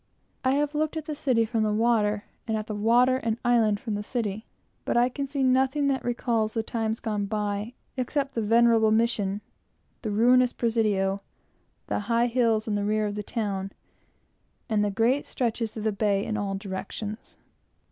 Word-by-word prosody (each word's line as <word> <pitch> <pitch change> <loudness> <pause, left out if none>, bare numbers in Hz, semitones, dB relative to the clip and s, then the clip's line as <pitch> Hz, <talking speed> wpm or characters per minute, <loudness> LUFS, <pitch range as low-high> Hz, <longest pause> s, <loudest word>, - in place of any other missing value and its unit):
I 260 0 +3
have 290 +1 0
looked 310 +1 -1
at 315 - -4
the 305 - -4
city 250 -6 +2
from 225 0 -1
the 215 -1 +1
water 210 -2 +2 0.2
and 225 +2 +2
islands 225 -4 +3
from 220 - -3
the 205 - -2
city, 215 -1 -3 0.4
but - - 0
I 240 +1 +4
can 275 +2 -4
see 275 0 -1
nothing 265 +2 +2
that 265 -2 -1
recalls 235 -2 0
the 225 - 0
times 225 0 -2
gone 210 -3 -2
by, 210 +1 -2 0.2
except 275 +2 -1
the 230 - -1
venerable 225 0 +4
Mission, 215 -3 +1 0.6
the 220 - -3
ruinous 245 +4 +4
Presidio, 210 -4 +1 0.7
the - - -1
high 230 +3 +1
hills 230 -3 +1
in 215 - -1
the 205 0 0
rear 215 +1 +1
of 205 - -2
the 210 - -3
town, 200 -3 -3 0.9
and 215 -3 +1
the 205 - +1
great 235 +7 +1
stretches 230 -2 -2
of 215 - -4
the 220 - +1
bay 200 0 +1
in 215 - -2
all 200 -2 -2
directions. 200 +3 -6
225 Hz, 170 wpm, -26 LUFS, 210-245 Hz, 0.9 s, I